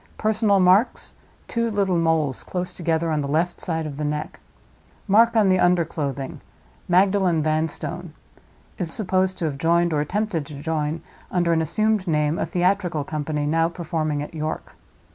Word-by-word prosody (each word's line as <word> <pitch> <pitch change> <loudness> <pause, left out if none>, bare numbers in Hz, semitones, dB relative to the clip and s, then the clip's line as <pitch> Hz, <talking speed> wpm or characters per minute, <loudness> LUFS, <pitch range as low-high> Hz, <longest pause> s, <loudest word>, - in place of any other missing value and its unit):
Personal 215 -2 +2
marks—two 215 +4 +1
little 200 -4 +1
moles, 160 -5 +1
close 180 -1 -4
together, 165 -1 -1
on 150 -1 0
the 140 - -3
left 165 +5 0
side 160 -2 -2
of 145 -2 -6
the 150 - -3
neck. 150 +1 -3 0.7
Mark 230 +4 +5
on 215 -3 +4
the 185 -1 +3
under 175 -1 +3
clothing—'Magdalen 160 - -1
Vanstone.' 155 +1 -2 0.6
Is 170 -2 -2
supposed 185 -2 0
to 170 - -2
have 140 -3 -3
joined, 170 +1 +2
or 150 - +1
attempted 175 -2 -2
to 150 - -9
join, 155 +1 -2 0.3
under 175 -2 +1
an 160 - +2
assumed 215 +4 0
name, 150 0 +1
a - - -1
theatrical 175 -3 0
company 150 0 -3
now 165 +2 +2
performing 155 -3 -2
at 150 - -9
York. 155 0 -4
165 Hz, 155 wpm, -23 LUFS, 155-185 Hz, 0.7 s, Mark